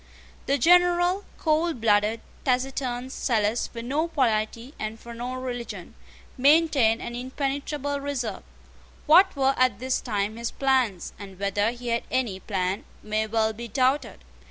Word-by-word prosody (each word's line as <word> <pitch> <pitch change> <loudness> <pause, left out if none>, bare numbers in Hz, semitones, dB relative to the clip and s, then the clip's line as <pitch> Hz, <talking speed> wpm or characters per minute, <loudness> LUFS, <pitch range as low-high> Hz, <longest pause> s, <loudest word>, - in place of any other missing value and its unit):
The 280 - +2
General, 355 +3 +4
coldblooded, 230 -10 +1 0.2
taciturn, 255 -1 -1
zealous 225 -3 0
for 230 -1 -8
no 290 +7 0
polity 235 -3 -1
and 215 +1 -4
for 235 +1 -10
no 245 +2 -5
religion, 250 -2 -6 0.5
maintained 280 -5 +4
an 240 - -5
impenetrable 280 +2 -3
reserve. 255 -8 -3 0.6
What 360 +4 +6
were 270 -1 +3
at 255 -5 +3
this 255 +3 -1
time 210 -1 -2
his 235 0 -2
plans, 255 -9 0
and 195 -2 -10
whether 200 +2 +1
he 240 0 -6
had 235 0 +1
any 235 -7 -1
plan, 190 -1 -2 0.2
may 215 0 -1
well 220 0 +1
be 235 +2 -7
doubted. 260 +5 0
245 Hz, 135 wpm, -26 LUFS, 220-275 Hz, 0.6 s, What